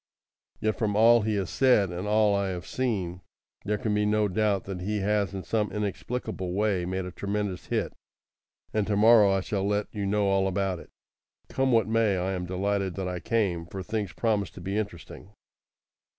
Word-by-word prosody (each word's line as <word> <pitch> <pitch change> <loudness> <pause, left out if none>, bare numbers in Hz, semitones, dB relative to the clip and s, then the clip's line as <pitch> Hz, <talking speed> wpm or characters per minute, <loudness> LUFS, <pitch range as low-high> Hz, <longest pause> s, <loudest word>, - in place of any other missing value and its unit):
Yet 110 -3 -1
from 105 -2 0
all 115 +2 +6
he 105 0 0
has 95 -3 -2
said, 115 -8 +3
and 90 +3 -4
all 105 -1 +3
I 100 0 0
have 90 -3 -4
seen, 95 -9 -2 0.4
there 105 +1 0
can 110 -3 -1
be 105 0 +2
no 105 0 +2
doubt 100 0 +1
that 95 -2 -6
he 105 +2 -2
has 100 -2 0
in 95 - -5
some 105 -3 -1
inexplicable 105 -2 -3
way 100 -3 +1
made 95 +1 -3
a 90 - -6
tremendous 100 0 -3
hit, - - -1 0.8
and 105 -2 0
to 105 - +1
morrow 110 -1 +7
I 95 0 +1
shall 95 +1 -2
let 105 +1 -1
you 100 -3 -2
know 105 +1 +1
all 95 0 +2
about 95 -1 -1
it. - - -13 0.6
Come 135 0 +1
what 115 -2 +4
may, 110 -3 +2
I 90 +1 -1
am 90 -2 -3
delighted 95 0 -1
that 95 -1 -3
I 90 -1 -3
came, 95 -7 -1
for 95 +2 -6
things 105 -1 -3
promise 105 -4 0
to - - -10
be 95 +3 -4
interesting. 100 -1 -6
100 Hz, 195 wpm, -27 LUFS, 95-105 Hz, 0.8 s, morrow